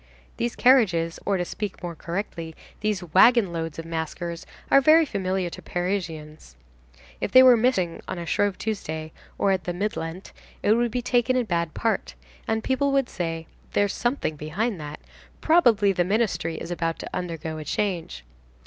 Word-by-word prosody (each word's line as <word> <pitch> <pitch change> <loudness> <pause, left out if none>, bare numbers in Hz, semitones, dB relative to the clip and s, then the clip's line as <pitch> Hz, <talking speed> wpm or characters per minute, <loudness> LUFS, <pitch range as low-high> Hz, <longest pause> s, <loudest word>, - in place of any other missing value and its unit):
These 235 0 -2
carriages, 185 -11 +3
or 200 -1 +2
to 175 - -1
speak 205 +1 -5
more 175 -1 -4
correctly, 170 -1 -5 0.2
these 210 -3 -1
wagon 215 -2 +6
loads 165 -2 -4
of 165 - -6
maskers 165 +1 -4 0.2
are 275 - +7
very 315 +3 +6
familiar 190 -6 -1
to - - -9
Parisians. 165 - -4 0.6
If - - -3
they 255 - +9
were 255 -1 +8
missing 220 -8 +1
on - - -4
a 170 - -5
Shrove 205 +3 0
Tuesday, 160 -7 -4 0.3
or 200 - +2
at 190 -2 -1
the 175 - -2
Mid 205 +4 -2
Lent, 165 +4 -6 0.3
it 210 - +5
would 240 +1 +2
be 245 +2 -3
taken 245 +1 +2
in 250 -2 +1
bad 170 -4 -1
part, 225 -1 -1 0.3
and 220 0 0
people 275 +1 +1
would 275 -2 +1
say: 165 -2 -4 0.3
"There's 205 -1 +2
something 240 - -1
behind 180 +6 -2
that. 150 0 -8 0.4
Probably 235 - +4
the 175 - +2
ministry 200 -4 0
is 170 - -6
about 165 -1 -1
to - - -7
undergo 165 -3 -4
a - - -5
change." 170 - -2
185 Hz, 175 wpm, -25 LUFS, 165-225 Hz, 0.6 s, they